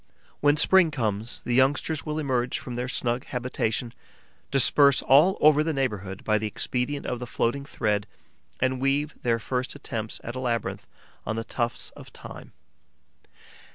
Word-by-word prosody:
When 145 Hz, +1 st, +3 dB
spring 185 Hz, +2 st, +5 dB
comes, 115 Hz, -5 st, -2 dB
the 120 Hz, -, -1 dB
youngsters 145 Hz, +5 st, +2 dB
will 150 Hz, 0 st, -2 dB
emerge 130 Hz, -5 st, 0 dB
from 125 Hz, -, -7 dB
their 125 Hz, +1 st, -3 dB
snug 125 Hz, -1 st, -1 dB
habitation, 120 Hz, -1 st, -2 dB, 0.6 s
disperse 140 Hz, +1 st, +4 dB
all 155 Hz, +8 st, +5 dB
over 150 Hz, 0 st, +5 dB
the 160 Hz, 0 st, -1 dB
neighbourhood 100 Hz, -8 st, -3 dB
by 110 Hz, -1 st, +2 dB
the 110 Hz, -, -2 dB
expedient 125 Hz, +6 st, -2 dB
of 125 Hz, -, -3 dB
the 125 Hz, -, -6 dB
floating 130 Hz, +4 st, -1 dB
thread 105 Hz, -6 st, -1 dB, 0.5 s
and 130 Hz, 0 st, 0 dB
weave 145 Hz, +2 st, +1 dB
their 115 Hz, -1 st, +1 dB
first 125 Hz, +3 st, -3 dB
attempts 110 Hz, -6 st, -5 dB
at 120 Hz, -, -5 dB
a -, -, -3 dB
labyrinth 120 Hz, -2 st, -2 dB, 0.4 s
on 105 Hz, -, -3 dB
the 115 Hz, -, -3 dB
tufts 120 Hz, +1 st, -2 dB
of -, -, -13 dB
thyme. -, -, -11 dB
125 Hz, 155 wpm, -26 LUFS, 115-140 Hz, 0.6 s, spring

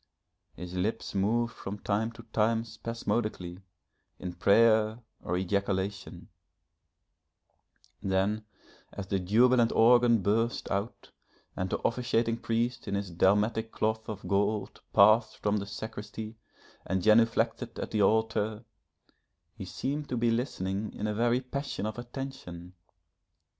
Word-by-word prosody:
His 90 Hz, 0 st, -8 dB
lips 105 Hz, +5 st, -2 dB
moved 115 Hz, +4 st, +1 dB
from 100 Hz, +1 st, -6 dB
time 105 Hz, +3 st, -1 dB
to 115 Hz, 0 st, -12 dB
time 115 Hz, +1 st, +2 dB
spasmodically, 110 Hz, -5 st, -3 dB, 0.6 s
in 90 Hz, -1 st, -6 dB
prayer 110 Hz, +4 st, +4 dB, 0.2 s
or 90 Hz, -, -2 dB
ejaculation: 100 Hz, +1 st, -2 dB, 1.7 s
then 100 Hz, +3 st, 0 dB, 0.5 s
as 100 Hz, -, -6 dB
the 95 Hz, 0 st, -1 dB
jubilant 115 Hz, +5 st, +4 dB
organ 120 Hz, -2 st, +5 dB
burst 115 Hz, +4 st, 0 dB
out, 100 Hz, +5 st, -3 dB, 0.4 s
and 95 Hz, +1 st, -2 dB
the -, -, 0 dB
officiating 115 Hz, -1 st, 0 dB
priest 115 Hz, +1 st, -1 dB
in 100 Hz, -, -1 dB
his 100 Hz, -2 st, -3 dB
dalmatic 105 Hz, +6 st, +2 dB
of -, -, -33 dB
cloth 110 Hz, 0 st, -1 dB
of 105 Hz, -2 st, -6 dB
gold 100 Hz, +1 st, 0 dB
passed 110 Hz, +1 st, +5 dB
from 105 Hz, 0 st, 0 dB
the 100 Hz, -1 st, -4 dB
sacristy 110 Hz, +1 st, -7 dB, 0.5 s
and 95 Hz, -1 st, -1 dB
genuflected 115 Hz, +2 st, +3 dB
at -, -, -5 dB
the 105 Hz, -, +1 dB
altar, 110 Hz, +1 st, +1 dB, 0.9 s
he -, -, -8 dB
seemed 145 Hz, +2 st, -3 dB
to 125 Hz, -, -1 dB
be 120 Hz, 0 st, +2 dB
listening 105 Hz, -4 st, -2 dB
in 105 Hz, -, -3 dB
a 105 Hz, -, 0 dB
very 120 Hz, +3 st, +2 dB
passion 135 Hz, -5 st, -4 dB
of 110 Hz, +2 st, -4 dB
attention. 120 Hz, -9 st, -7 dB
110 Hz, 125 wpm, -29 LUFS, 100-115 Hz, 1.7 s, organ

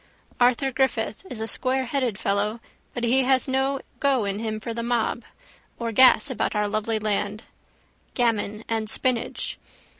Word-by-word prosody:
Arthur 250 Hz, +2 st, +3 dB
Griffith 260 Hz, -, 0 dB
is 220 Hz, -, -4 dB
a -, -, 0 dB
squareheaded 255 Hz, -1 st, -1 dB
fellow 210 Hz, +3 st, -1 dB, 0.3 s
but 240 Hz, -, -5 dB
he 250 Hz, +3 st, +4 dB
has 260 Hz, +1 st, +2 dB
no 265 Hz, +1 st, 0 dB, 0.2 s
go 270 Hz, -6 st, +2 dB
in 200 Hz, +1 st, -2 dB
him 220 Hz, -1 st, -3 dB
for 230 Hz, +1 st, -5 dB
the 235 Hz, -, -3 dB
mob. 235 Hz, 0 st, -1 dB, 0.5 s
Or 230 Hz, -1 st, -3 dB
gas 260 Hz, +4 st, +6 dB
about 250 Hz, -, -1 dB
our 210 Hz, 0 st, +1 dB
lovely 215 Hz, +1 st, -1 dB
land. 210 Hz, 0 st, -1 dB, 0.7 s
Gammon 220 Hz, -3 st, 0 dB
and 220 Hz, -1 st, -2 dB
spinach. 250 Hz, 0 st, -1 dB
235 Hz, 150 wpm, -25 LUFS, 215-260 Hz, 0.7 s, gas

